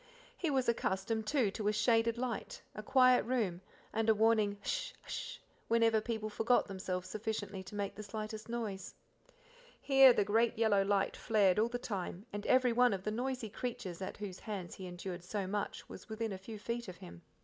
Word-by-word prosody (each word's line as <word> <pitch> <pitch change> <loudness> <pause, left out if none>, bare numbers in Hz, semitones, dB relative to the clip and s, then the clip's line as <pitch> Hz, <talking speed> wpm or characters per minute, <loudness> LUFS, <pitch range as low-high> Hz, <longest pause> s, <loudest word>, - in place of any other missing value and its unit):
He 340 - -1
was 265 -3 +1
accustomed, 220 -1 0
too, 250 -8 +2
to 210 +1 -3
a - - +4
shaded 225 +2 +2
light, 245 -2 -3
a - - -6
quiet 255 +1 +5
room, 220 -8 -1 0.3
and 225 0 +1
a 220 - +6
warning 215 -2 +3
H'sh! - - -2
h'sh! - - -5 0.3
whenever 225 -1 +4
people 220 -1 -3
forgot 225 +3 +2
themselves 185 -2 -4
sufficiently 210 -1 -4
to 190 +2 -10
make 200 -1 -2
the 215 - -8
slightest 215 +1 -6
noise. 220 -5 -4 0.8
Here 270 -2 +7
the 205 - +2
great 225 +3 +2
yellow 215 -3 +4
light 195 0 +1
flared 205 -3 +3
all 225 +2 +3
the 245 - -2
time, 195 -4 -5
and 205 0 -4
every 255 -2 +4
one 245 -1 +4
of 190 -1 -4
the 215 - -1
noisy 250 +1 -2
creatures 230 -8 -5
at 185 - -5
whose 200 -3 -6
hands 200 -5 -5
he 190 - -7
endured 175 0 -6
so 195 +2 -3
much 205 +2 -3
was 185 - -11
within 220 -1 -3
a - - -5
few 215 +3 -8
feet 235 +2 -4
of 180 -2 -8
him. 85 0 -11
215 Hz, 195 wpm, -34 LUFS, 195-235 Hz, 0.8 s, Here